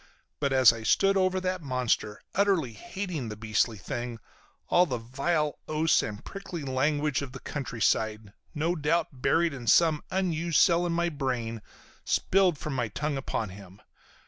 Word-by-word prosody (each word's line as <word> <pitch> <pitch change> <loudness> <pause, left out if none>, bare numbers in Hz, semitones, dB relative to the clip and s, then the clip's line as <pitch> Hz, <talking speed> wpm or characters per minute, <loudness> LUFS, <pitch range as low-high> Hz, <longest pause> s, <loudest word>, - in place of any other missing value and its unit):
But 140 -2 0
as 130 -4 +7
I 115 - -7
stood 195 - +3
over 185 -1 +2
that 185 -1 -2
monster, 125 -6 -1
utterly 190 - +2
hating 165 - -5
the 105 - -5
beastly 110 +1 0
thing, 120 +4 -5 0.5
all 180 +1 +4
the 125 -5 -2
vile 140 +6 -1
oaths 155 +1 +3
and 105 -1 -6
prickly 190 -5 -7
language 145 +2 0
of 135 -3 -7
the 135 - -7
countryside, 110 -6 -1 0.2
no 165 +4 0
doubt 160 +1 +1
buried 165 +4 +2
in 125 -4 -8
some 160 +4 +4
unused 170 -3 0
cell 175 -1 +4
in - - -1
my 170 +1 +1
brain, 125 -7 -3 0.4
spilled 185 -4 +2
from 150 +1 -5
my 125 -3 -1
tongue 145 +8 -3
upon 125 -5 -3
him. 95 0 -12
145 Hz, 160 wpm, -28 LUFS, 115-170 Hz, 0.5 s, as